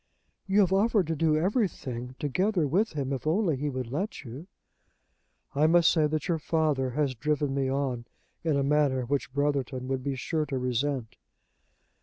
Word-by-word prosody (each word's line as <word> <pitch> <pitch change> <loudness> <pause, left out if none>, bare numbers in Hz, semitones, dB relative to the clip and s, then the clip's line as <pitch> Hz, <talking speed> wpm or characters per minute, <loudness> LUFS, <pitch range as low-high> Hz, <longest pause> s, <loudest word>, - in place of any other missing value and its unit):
"You 195 +2 +4
have 190 -1 +2
offered 205 -1 +3
to 165 - 0
do 155 0 +2
everything 155 - -1
together 180 +4 +1
with 190 +9 +1
him, 140 -2 -2
if 135 +3 -4
only 170 -1 +2
he 145 +3 -2
would 130 -3 -4
let 190 +10 -3
you." 135 +7 -9 1.1
"I 150 +2 +3
must 170 0 +5
say 155 -3 +3
that 155 +1 -2
your 170 -3 0
father 150 -5 +1
has 140 +1 0
driven 145 +2 -1
me 135 -1 0
on 130 -3 -1 0.4
in 155 -4 +1
a 140 - +1
manner 140 -3 +2
which 140 0 -2
Brotherton 135 -2 -1
would 135 -1 -1
be 140 -1 -2
sure 155 +4 -2
to 135 - -2
resent." 125 -1 -2
145 Hz, 175 wpm, -28 LUFS, 130-165 Hz, 1.1 s, must